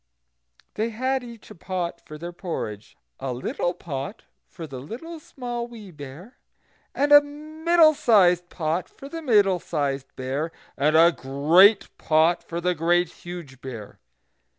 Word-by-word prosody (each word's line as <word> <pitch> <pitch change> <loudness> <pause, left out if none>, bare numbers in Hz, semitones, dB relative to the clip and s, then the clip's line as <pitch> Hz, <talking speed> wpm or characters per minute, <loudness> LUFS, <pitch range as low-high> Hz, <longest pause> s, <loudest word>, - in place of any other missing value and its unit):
They 220 +2 -1
had 260 +3 -1
each 235 -3 -12
a - - -8
pot 180 -2 -4
for 155 - -10
their 170 +3 -7
porridge, 110 - -6 0.2
a 135 - -3
little 175 +7 -2
pot 140 +5 -6 0.2
for 165 - -9
the 135 -4 -8
Little 265 - -8
Small 240 -5 -5
Wee 220 -5 -11
Bear, 150 - -11 0.6
and 290 +1 +1
a 290 0 +10
middle 310 +3 +2
sized 180 - +4
pot 165 +1 -2
for 275 - -12
the 330 +3 -6
Middle 205 - +3
sized 140 -5 -3
Bear, 135 +5 -3 0.2
and 150 +3 +3
a 170 +1 +7
great 165 +10 +4
pot 160 +2 +3
for 170 - -5
the 180 +1 +1
Great 175 +2 +2
Huge 170 -7 -10
Bear. 115 -6 -9
175 Hz, 150 wpm, -24 LUFS, 150-235 Hz, 0.6 s, a